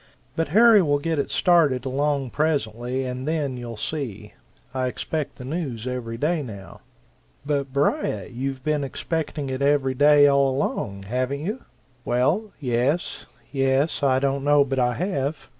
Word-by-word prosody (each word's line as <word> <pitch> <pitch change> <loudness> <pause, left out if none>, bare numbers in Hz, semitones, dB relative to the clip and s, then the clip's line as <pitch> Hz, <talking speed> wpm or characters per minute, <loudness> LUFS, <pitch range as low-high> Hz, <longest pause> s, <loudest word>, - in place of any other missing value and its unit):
But 165 - 0
Harry 220 +5 +6
will 145 -4 +2
get 160 +1 -1
it - - -1
started 150 -8 +3
along 135 -1 0
presently, 130 -4 -1
and 130 +2 -4
then 150 -5 -1
you'll 120 -2 -7
see! 135 -6 -5 0.4
I 130 -1 0
expect 140 +5 -3
the 125 - -9
news 135 -6 -4
every 125 -3 -4
day 155 +5 0
now." 100 -8 -9 0.7
"But 140 -2 -1
Beriah, 130 -7 0
you've 130 +1 -4
been 150 -1 0
expecting 150 0 -3
it 130 +1 -3
every 140 -2 +2
day, 145 +2 +6
all 140 -1 +4
along, 100 -7 -2
haven't 130 +6 -2
you?" 215 +10 -4 0.4
"Well, 155 - +1
yes; 130 +5 -1 0.2
yes 135 +3 +1
I 135 -2 +3
don't 135 0 0
know 145 0 +5
but 135 -1 -2
I 125 -1 +2
have. 155 -5 -2
140 Hz, 155 wpm, -24 LUFS, 125-150 Hz, 0.7 s, Harry